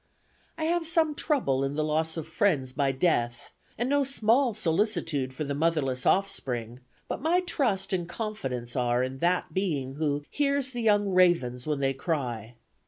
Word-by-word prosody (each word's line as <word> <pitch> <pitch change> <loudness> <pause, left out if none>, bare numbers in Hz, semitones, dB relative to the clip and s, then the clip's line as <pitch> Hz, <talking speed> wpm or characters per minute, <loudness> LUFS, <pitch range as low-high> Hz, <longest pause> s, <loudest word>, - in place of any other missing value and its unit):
I 320 - -3
have 335 0 0
some 325 -2 +2
troubles 255 - 0
in 135 +1 -2
the 155 - 0
loss 160 +2 0
of 160 -1 -5
friends 155 -7 +1
by 140 0 +1
death, 120 -5 -1 0.2
and 240 - -1
no 285 +1 +2
small 245 -2 +2
solicitude 165 - +1
for 135 +4 -4
the 140 -1 -3
motherless 145 -4 0
offspring, 125 - 0 0.3
but - - -4
my 340 +5 +2
trust 235 - -1
and 175 -2 -1
confidence 135 - -4
are 125 -1 +1
in 130 +1 -4
that 175 0 0
being 145 -8 -2
who 145 -2 -1
'hears 280 -2 0
the 245 -2 -4
young 205 -2 +3
ravens 175 -10 +2
when 150 -2 -1
they 135 0 +1
cry.' 125 - -3
160 Hz, 170 wpm, -27 LUFS, 135-215 Hz, 0.3 s, young